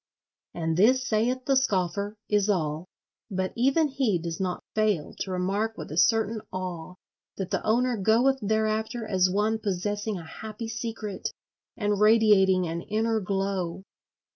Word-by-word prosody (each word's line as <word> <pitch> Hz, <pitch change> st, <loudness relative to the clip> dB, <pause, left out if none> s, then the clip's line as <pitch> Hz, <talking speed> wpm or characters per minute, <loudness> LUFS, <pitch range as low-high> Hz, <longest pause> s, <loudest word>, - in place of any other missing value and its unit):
And 165 Hz, -1 st, -1 dB
this 250 Hz, +6 st, +4 dB
saith 245 Hz, +4 st, 0 dB
the 275 Hz, -, +3 dB
scoffer, 200 Hz, -4 st, 0 dB
is 210 Hz, 0 st, +2 dB
all; 160 Hz, -3 st, -1 dB, 0.4 s
but 190 Hz, -2 st, -2 dB
even 275 Hz, +6 st, +3 dB
he 265 Hz, -8 st, +1 dB
does 165 Hz, -1 st, -5 dB
not 185 Hz, -2 st, -2 dB
fail 210 Hz, -8 st, 0 dB
to -, -, -3 dB
remark 195 Hz, +5 st, -1 dB
with -, -, -7 dB
a 155 Hz, -, -5 dB
certain 220 Hz, +3 st, +2 dB
awe 180 Hz, -2 st, -5 dB, 0.4 s
that 190 Hz, -2 st, -4 dB
the -, -, -1 dB
owner 240 Hz, +2 st, +2 dB
goeth 235 Hz, +7 st, +3 dB
thereafter 220 Hz, +2 st, 0 dB
as 185 Hz, -3 st, +2 dB
one 210 Hz, +4 st, +1 dB
possessing 205 Hz, +1 st, -2 dB
a 170 Hz, -, -8 dB
happy 220 Hz, +6 st, -7 dB
secret 225 Hz, -3 st, -4 dB, 0.5 s
and 205 Hz, -3 st, 0 dB
radiating 210 Hz, -4 st, +5 dB
an 165 Hz, +1 st, -3 dB
inner 220 Hz, +3 st, 0 dB
glow. 190 Hz, -2 st, -2 dB
210 Hz, 145 wpm, -27 LUFS, 185-225 Hz, 0.5 s, radiating